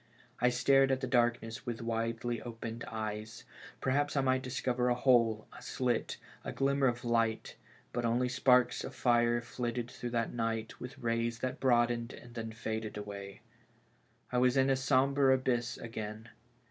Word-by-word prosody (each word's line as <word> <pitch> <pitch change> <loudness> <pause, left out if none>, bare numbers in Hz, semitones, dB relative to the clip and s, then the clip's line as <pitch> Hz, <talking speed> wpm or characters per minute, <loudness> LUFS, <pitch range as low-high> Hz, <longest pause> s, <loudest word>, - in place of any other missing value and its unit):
I 125 - +4
stared 135 +2 +4
at 130 - +1
the 130 - -2
darkness 120 -2 +1
with 120 -1 -3
widely 115 0 -2
opened 115 0 -6
eyes; 110 -2 -5 0.4
perhaps 145 +2 +1
I - - +4
might 130 -1 +2
discover 125 -1 0
a 120 - +3
hole, 115 -4 +3
a - - -11
slit, 125 -3 -1 0.3
a - - -4
glimmer 140 0 +2
of 120 0 -2
light; 115 -1 0 0.4
but 120 - -1
only 120 +2 +2
sparks 125 -1 +3
of - - -7
fire 120 -1 +3
flitted 120 0 -4
through 120 - -5
that 115 -1 -1
night, 115 -1 -2
with 125 +3 -8
rays 115 -2 -1
that 130 - -2
broadened 120 -1 +2
and 120 0 -12
then 115 -1 -5
faded 110 -1 -4
away. 100 -1 -7 0.9
I 125 - +2
was 125 +1 +3
in 135 0 +4
a - - +4
sombre 135 0 +3
abyss 120 -3 -1
again. 110 -1 -6
120 Hz, 160 wpm, -32 LUFS, 115-130 Hz, 0.9 s, I